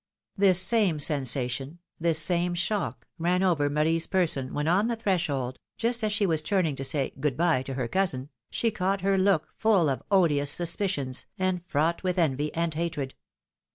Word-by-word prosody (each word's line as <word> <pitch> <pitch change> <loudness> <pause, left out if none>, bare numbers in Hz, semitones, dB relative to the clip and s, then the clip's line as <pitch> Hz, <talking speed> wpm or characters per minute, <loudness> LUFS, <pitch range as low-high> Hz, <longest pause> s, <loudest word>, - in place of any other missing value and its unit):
This 190 -3 +4
same 190 -5 +2
sensation, 135 0 -1 0.2
this 165 -1 +2
same 175 +2 +1
shock, 195 +3 -2
ran 180 +3 +1
over 155 -6 +2
Marie's 160 +3 +1
person, 160 -9 0
when 150 +1 -2
on 190 +6 +3
the 235 - -1
threshold, 165 - -1 0.2
just 235 0 0
as 215 - +1
she 205 0 +1
was 160 -4 +1
turning 165 -3 0
to 135 - -4
say 135 0 -1
good 135 -2 -1
bye" 165 -6 +2
to 130 0 -6
her 130 -3 -2
cousin, 145 -5 -1 0.2
she 230 - 0
caught 195 -1 -1
her 195 +1 +2
look 190 -5 +2
full 200 -8 +3
of 135 - -2
odious 155 -8 +3
suspicions, 170 -5 -1
and 185 -2 -1
fraught 160 +2 0
with 185 -1 -1
envy 150 -3 +1
and 170 -1 0
hatred. 155 -4 -3
170 Hz, 175 wpm, -27 LUFS, 145-190 Hz, 0.2 s, This